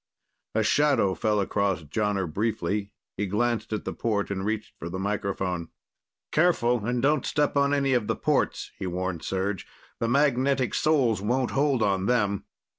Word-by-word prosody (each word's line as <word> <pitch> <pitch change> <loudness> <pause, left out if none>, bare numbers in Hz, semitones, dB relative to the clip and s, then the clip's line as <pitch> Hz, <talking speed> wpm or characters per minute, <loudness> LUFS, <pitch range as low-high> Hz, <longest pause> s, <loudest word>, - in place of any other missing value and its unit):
A 110 - +3
shadow 140 -6 +3
fell 105 +4 +1
across 100 -3 0
Jonner 100 +5 -1
briefly. 100 +2 -2 0.3
He 105 +1 -1
glanced 115 +4 0
at 110 - -3
the - - -3
port 105 -3 -1
and 95 -1 -2
reached 110 +1 -3
for 85 - -5
the 95 - -4
microphone. 95 -3 -2 0.6
"Careful 125 -9 +2
and 120 +2 -1
don't 145 -1 +3
step 145 -1 0
on 140 0 +3
any 140 -2 +2
of 120 -4 +1
the 115 - 0
ports," - - 0
he 95 - -3
warned 90 -1 -3
Serj. 95 +2 -2 0.4
"The 115 - 0
magnetic 135 -1 +2
soles 130 -10 +2
won't 125 +5 0
hold 135 -4 +2
on 95 -2 +1
them." 105 -5 +1
105 Hz, 165 wpm, -26 LUFS, 95-130 Hz, 0.6 s, A